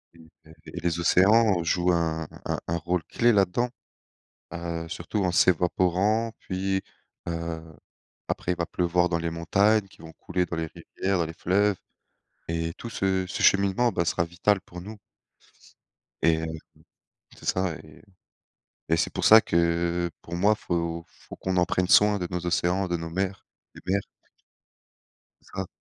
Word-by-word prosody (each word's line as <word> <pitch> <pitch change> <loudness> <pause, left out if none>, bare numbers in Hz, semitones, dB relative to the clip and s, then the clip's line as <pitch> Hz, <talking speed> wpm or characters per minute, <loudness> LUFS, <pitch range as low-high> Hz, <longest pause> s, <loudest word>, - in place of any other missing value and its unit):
et - - -18 0.3
et 80 - -16 0.3
et - - -1
les 85 -1 -1
océans 95 +2 +4
jouent 90 +2 +2
un 80 -2 0 0.2
un - - -1
un 85 - 0
rôle 85 +1 -1
clé 120 0 +2
là-dedans. 100 +5 +2 0.9
Heu, 85 -1 -4
surtout 90 +5 -3
en 90 -2 +1
s'évaporant, 95 +6 +2
puis, 95 0 -2 0.5
heu, 85 -1 -3 0.7
après 90 - -1
il 90 - -5
va 85 - -1
pleuvoir 90 0 +1
dans 85 - 0
les 85 0 -2
montagnes 100 +6 +2
qui 90 - -18
vont 80 0 -10
couler 90 +2 -2
dans 80 -1 -5
les 80 - -2
rivières, 95 +4 -3
dans - - +2
les 80 - -6
fleuves, 100 +3 +1 0.7
et 80 0 -2
tout 115 - -7
ce 95 -3 0
ce - - -4
cheminement 100 +5 +4
bah 85 -4 0
sera 85 - +1
vital 90 +4 +1
pour 90 0 -11
nous 105 +5 -8 1.3
et 80 -1 +4
heu 80 0 -4 0.8
c'est - - -14
ça, 95 -3 0
et 75 -2 -16 0.9
et 80 - +2
c'est - - 0
pour - - -2
ça 110 +1 +9
que, 85 0 0
pour 85 - -7
moi 100 +4 +4
faut 85 -4 -3
faut - - -13
qu'on 95 -1 -2
en 90 - +4
prenne 90 -1 0
soin 105 +1 +5
de 90 - -3
nos 90 -1 -4
océans, 90 +2 +1
de 85 - -1
nos 80 0 -6
mers, 95 +2 -3 0.3
des - - -13
mers. 100 +1 +2 1.5
Grave. 95 -1 -4
90 Hz, 165 wpm, -26 LUFS, 85-95 Hz, 1.5 s, ça